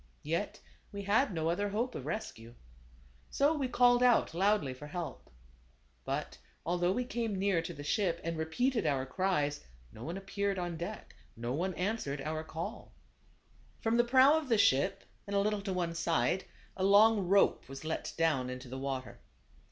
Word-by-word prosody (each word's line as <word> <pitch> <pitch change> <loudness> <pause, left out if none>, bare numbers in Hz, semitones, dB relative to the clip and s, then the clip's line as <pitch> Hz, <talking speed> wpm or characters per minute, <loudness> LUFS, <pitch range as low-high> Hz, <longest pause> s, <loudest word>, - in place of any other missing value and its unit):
Yet 165 +7 -2 0.3
we 200 0 -6
had 210 +6 +2
no 160 -3 -1
other 205 +5 0
hope 235 +5 -1
of - - -6
rescue. 115 - -5 0.7
So 285 +3 +3
we 285 -4 -1
called 245 0 +4
out 245 -7 +4
loudly 190 -6 +2
for 145 +3 -10
help. 170 +2 -6 0.8
But, - - -3 0.3
although 175 +1 +1
we 245 +6 -1
came 230 -4 -2
near 190 -3 +2
to 165 - -6
the 145 - -8
ship, 170 +2 0
and 165 0 -2
repeated 190 +7 0
our 135 -3 +1
cries, 150 -2 0 0.3
no 110 - -10
one 170 +6 -4
appeared 200 0 -2
on 175 -2 -3
deck; 175 +6 -7 0.2
no 120 +2 -3
one 180 +6 -1
answered 180 -7 -2
our 155 +2 -3
call. 160 +1 -6 0.9
From 225 +1 +1
the 240 - +5
prow 260 +4 +6
of 295 -4 -8
the 230 - +4
ship, 185 +1 +3 0.2
and 200 - -3
a - - +4
little 210 0 0
to 195 -1 -4
one 175 -2 -1
side, 165 +1 0 0.3
a 190 - -3
long 205 0 +5
rope 195 -7 +3
was 135 +2 -8
let 160 - -3
down 150 -6 +1
into 125 0 -7
the 130 +1 -5
water. 135 -1 -4
185 Hz, 175 wpm, -32 LUFS, 155-210 Hz, 0.9 s, prow